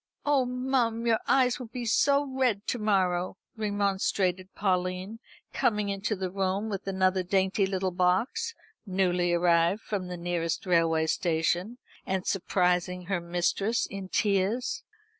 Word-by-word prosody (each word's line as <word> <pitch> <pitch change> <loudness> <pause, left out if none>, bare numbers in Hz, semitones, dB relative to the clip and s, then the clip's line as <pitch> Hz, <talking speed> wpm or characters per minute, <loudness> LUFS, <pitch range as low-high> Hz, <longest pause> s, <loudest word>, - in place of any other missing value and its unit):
"Oh 285 -3 +3
mum, 250 -2 0
your 230 -1 +3
eyes 255 -1 +3
will 250 - -7
be 240 +1 -6
so 280 +5 +3
red 255 -6 0
to 245 - -1
morrow," 185 -4 +1 0.2
remonstrated 195 -3 0
Pauline, 185 +2 -1 0.3
coming 210 -2 +1
into 200 +2 -1
the 185 -1 -4
room 195 +2 -1
with 195 -2 -5
another 190 -1 +2
dainty 190 +2 +1
little 190 -1 -1
box, 210 - 0 0.3
newly 180 -2 +1
arrived 170 +3 +3
from 195 -4 -3
the 180 0 -5
nearest 170 -1 -2
railway 165 -3 +3
station, 175 +7 0 0.3
and 190 -1 -2
surprising 180 -1 0
her 180 -1 -2
mistress 175 +6 0
in 195 -1 -7
tears. 215 - 0
190 Hz, 135 wpm, -28 LUFS, 180-220 Hz, 0.3 s, Oh